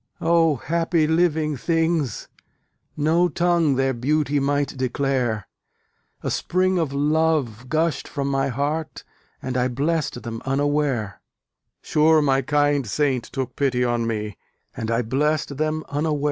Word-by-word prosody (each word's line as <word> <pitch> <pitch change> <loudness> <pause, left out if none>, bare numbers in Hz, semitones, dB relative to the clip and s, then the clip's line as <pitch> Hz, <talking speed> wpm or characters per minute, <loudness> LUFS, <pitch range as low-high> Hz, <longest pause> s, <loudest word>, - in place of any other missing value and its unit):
O 165 -2 +3
happy 165 +3 0
living 160 -2 +1
things! 165 - 0 0.7
no 165 +4 +3
tongue 170 -5 +2
Their 135 0 +1
beauty 145 +4 0
might 140 0 0
declare: 130 -4 -1 0.8
A - - -1
spring 185 0 +1
of 160 -5 -1
love 145 -5 0
gushed 160 -2 0
from 140 -1 -3
my 135 0 +1
heart, 145 +5 -3 0.4
And 130 -1 -3
I 125 0 +2
blessed 140 +1 -1
them 115 -1 -5
unaware: 135 -6 0 0.6
Sure 155 +1 +4
my 135 -2 +2
kind 145 -1 +1
saint 130 +1 0
took 130 -2 -5
pity 130 -3 +1
on 120 -1 0
me, 105 -2 -4 0.4
And 110 - -4
I 115 +1 +1
blessed 145 +4 0
them 155 +1 -1
unaware. 150 +1 -1
145 Hz, 130 wpm, -23 LUFS, 130-155 Hz, 0.8 s, Sure